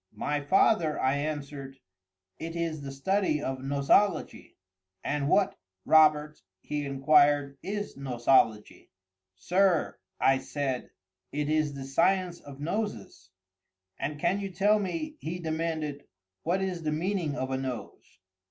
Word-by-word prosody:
"My 145 +7 -1
father," 165 0 +3
I 135 +2 +2
answered, 140 -2 -5 0.6
"it 165 +1 -5
is 165 -3 -2
the 140 -1 -6
study 180 +3 0
of 135 -2 -3
Nosology." 145 +7 +1 0.5
"And 145 -1 -1
what, 195 +2 +2 0.3
Robert," 150 -1 +4 0.2
he 145 +4 -4
inquired, 145 0 +3
"is 205 +1 -4
Nosology?" 120 -4 +1 0.5
"Sir," 180 - +1 0.2
I 135 0 +4
said, 135 -2 -3 0.4
"it 150 0 -2
is 155 -2 +1
the 135 - -6
science 175 +5 +1
of 140 -1 -12
Noses." 150 - -4 0.7
"And 145 +2 -3
can 195 +6 +1
you 195 -1 -4
tell 205 +3 +3
me," 305 - -4
he 165 +3 -4
demanded, 160 -3 -3 0.3
"what 185 +4 0
is 185 -3 -3
the 155 -1 -1
meaning 165 -1 -1
of 130 -2 -3
a 130 - 0
nose?" 130 -3 -7
150 Hz, 130 wpm, -28 LUFS, 140-175 Hz, 0.7 s, Robert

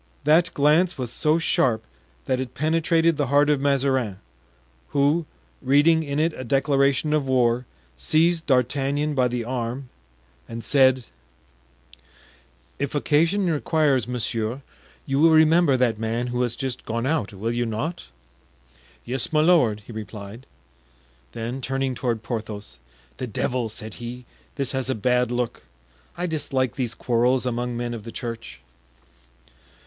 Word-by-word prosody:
That 165 +4 +4
glance 155 +5 +3
was 125 -3 -3
so 155 +1 +2
sharp 120 -8 +1 0.4
that 130 - 0
it 130 -2 -5
penetrated 165 +1 +2
the 145 -3 0
heart 145 +2 +4
of 145 -2 +1
Mazarin, 135 -7 +1 0.8
who, 145 +3 +2 0.3
reading 145 +5 +4
in 145 -2 -3
it 160 +2 +1
a - - -6
declaration 140 +3 +2
of 150 -3 +1
war, 125 -1 +2 0.3
seized 160 - +2
D'Artagnan 140 +3 +1
by 130 -3 +2
the 120 -1 -3
arm 125 +2 -4 0.6
and 115 0 -6
said: 130 -1 +4 1.7
"If 140 +1 -2
occasion 165 +7 +2
requires, 150 -5 +1
monsieur, 120 +1 -3 0.4
you 135 0 0
will 165 +2 +6
remember 160 -2 +5
that 120 -4 +1
man 115 +2 -2
who 125 - 0
has 120 -2 -1
just 130 -2 -4
gone 115 +2 -3
out, 150 -7 0
will 105 +4 -3
you 120 0 -1
not?" 115 - -4 1.0
"Yes, 125 0 -3
my 155 -1 +3
lord," 145 -11 +3
he 105 - -12
replied. 105 +2 -8 0.9
Then, 120 +4 -4
turning 135 0 -1
toward 120 -3 -2
Porthos, 105 - -6 0.4
"The 130 - -4
devil!" 120 +2 -1
said 110 0 -7
he, 120 +1 -7 0.3
"this 140 -3 -2
has 130 -1 -2
a 130 - +1
bad 125 +2 +1
look. 120 -1 -2 0.6
I 175 - -1
dislike 135 -6 -1
these 125 -3 -3
quarrels 125 +2 +1
among 120 0 -2
men 120 0 -3
of 115 - -6
the 115 - -8
church." 115 - -7
130 Hz, 145 wpm, -24 LUFS, 120-145 Hz, 1.7 s, will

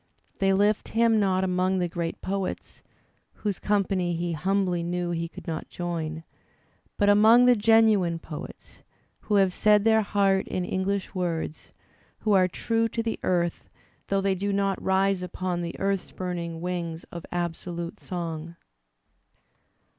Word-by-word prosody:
They 195 0 +3
lift 205 +2 +1
hina 230 0 +4
not 190 -3 +2
among 185 0 +1
the 180 -1 0
great 170 -1 -4
poets, 195 -1 -4 0.5
whose 205 -4 -3
company 195 -4 0
he 170 +1 -2
humbly 180 +2 0
knew 175 +1 -2
he 170 0 -2
could - - -12
not 160 -1 -5
join, 165 -2 -4 0.7
but 205 - +2
among 220 +4 +7
the 250 0 +6
genuine 215 -5 +4
poets, 160 -2 -10 0.4
who 210 - -1
have 195 -2 +4
said 210 0 +4
their 220 0 +4
heart 195 -2 +1
in 180 - -2
English 190 +2 -2
words, 170 -4 -3 0.5
who 215 - 0
are 185 -2 +5
true 225 +4 0
to 230 - -2
the 225 - -3
earth 175 -2 -1 0.4
though 195 0 +1
they 195 0 +1
do 200 +2 -2
not 195 -1 0
rise 190 0 +2
upon 180 0 -3
the 170 0 -5
earth 195 -1 +1
spuming 170 -3 -5
wings 170 -2 -3
of 170 -2 -7
absolute 170 0 -4
song. 170 -2 -5
185 Hz, 145 wpm, -26 LUFS, 175-200 Hz, 0.7 s, among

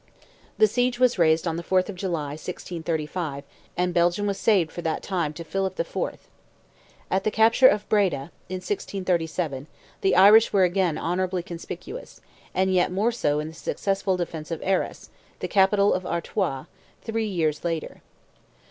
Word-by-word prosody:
The 435 - +6
siege 245 - 0
was 250 -5 +3
raised 160 0 +3
on 165 0 -1
the 170 - -5
4th 185 +1 +2
of 205 - -5
July, 170 -6 -3
1635, 160 -2 -4 0.3
and 180 0 0
Belgium 175 +4 +2
was 200 -1 -1
saved 190 -8 +3
for 175 - -6
that 160 -2 -2
time 175 -6 -1
to 170 - -7
Philip 190 +3 -3
IV. - - -2 0.9
At 190 0 +1
the - - +2
capture 225 +4 +5
of 205 -2 +2
Breda, 185 -8 +1 0.2
in 185 - -3
1637, 175 - -2 0.3
the 190 - +3
Irish 210 +4 +7
were 195 -2 +4
again 180 -3 +1
honourably 180 +1 -1
conspicuous, 175 - -8 0.4
and 190 0 +2
yet 180 -1 +2
more 205 +6 +1
so 150 -11 0
in 155 +1 -4
the - - -11
successful 195 +3 -1
defence 165 -3 -5
of 165 - -4
Arras, 190 0 -1 0.3
the - - -3
capital 200 +1 +4
of 185 - -1
Artois, 170 -5 -2 0.4
three 225 -1 -2
years 160 -6 -1
later. 165 -2 -3
180 Hz, 160 wpm, -25 LUFS, 165-200 Hz, 0.9 s, Irish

